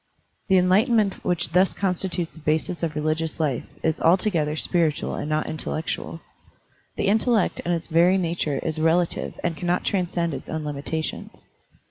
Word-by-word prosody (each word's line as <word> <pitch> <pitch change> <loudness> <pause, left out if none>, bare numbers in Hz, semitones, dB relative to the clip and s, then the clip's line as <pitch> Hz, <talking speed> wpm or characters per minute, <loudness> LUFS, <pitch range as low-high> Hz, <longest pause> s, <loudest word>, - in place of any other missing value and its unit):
The 190 - +5
enlightenment 200 +3 +3
which 175 -4 0
thus 185 +2 +3
constitutes 180 -3 -1
the - - -13
basis 160 +3 -1
of 160 -3 -2
the - - -1
religious 155 +1 -1
life 145 -6 0 0.2
is 160 0 0
altogether 165 -4 +2
spiritual 160 -1 +1
and 150 - -4
not 155 0 0
intellectual. 160 +1 -4 0.7
The - - -1
intellect 220 +1 +2
in 175 - -2
its 170 -1 -1
very 175 +3 +4
nature 165 -5 -1
is 160 -1 -2
relative 165 +2 +1
and 170 -2 0
cannot 175 +2 -1
transcend 175 -3 0
its 135 - -7
own 160 -1 -3
limita 150 +2 -3
tions. - - -7
170 Hz, 160 wpm, -24 LUFS, 155-180 Hz, 0.7 s, The